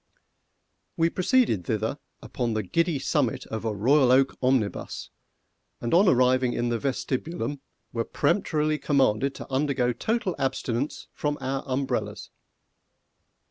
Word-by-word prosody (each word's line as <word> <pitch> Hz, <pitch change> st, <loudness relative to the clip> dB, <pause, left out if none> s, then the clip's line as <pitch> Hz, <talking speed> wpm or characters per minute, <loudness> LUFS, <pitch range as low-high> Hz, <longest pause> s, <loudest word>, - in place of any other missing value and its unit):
We 165 Hz, +1 st, +2 dB
proceeded 190 Hz, -, +2 dB
thither 110 Hz, -, -1 dB, 0.2 s
upon 120 Hz, -4 st, -2 dB
the 110 Hz, -, 0 dB
giddy 165 Hz, -, +1 dB
summit 135 Hz, -2 st, 0 dB
of 110 Hz, -, -5 dB
a 110 Hz, -2 st, -1 dB
Royal 130 Hz, +5 st, +4 dB
Oak 135 Hz, +1 st, +4 dB
omnibus, 125 Hz, -5 st, -1 dB, 0.7 s
and 120 Hz, -, -3 dB
on 190 Hz, +4 st, +6 dB
arriving 125 Hz, -2 st, +3 dB
in 120 Hz, 0 st, -1 dB
the 120 Hz, -1 st, 0 dB
vestibulum, 135 Hz, +1 st, -3 dB, 0.3 s
were 115 Hz, -, 0 dB
peremptorily 155 Hz, -1 st, +1 dB
commanded 135 Hz, -2 st, +2 dB
to -, -, -9 dB
undergo 130 Hz, -3 st, +1 dB
total 215 Hz, -, -1 dB
abstinence 130 Hz, -1 st, -2 dB
from 145 Hz, 0 st, -2 dB
our 135 Hz, 0 st, -2 dB
umbrellas. 135 Hz, +1 st, -2 dB
135 Hz, 125 wpm, -26 LUFS, 120-150 Hz, 0.7 s, on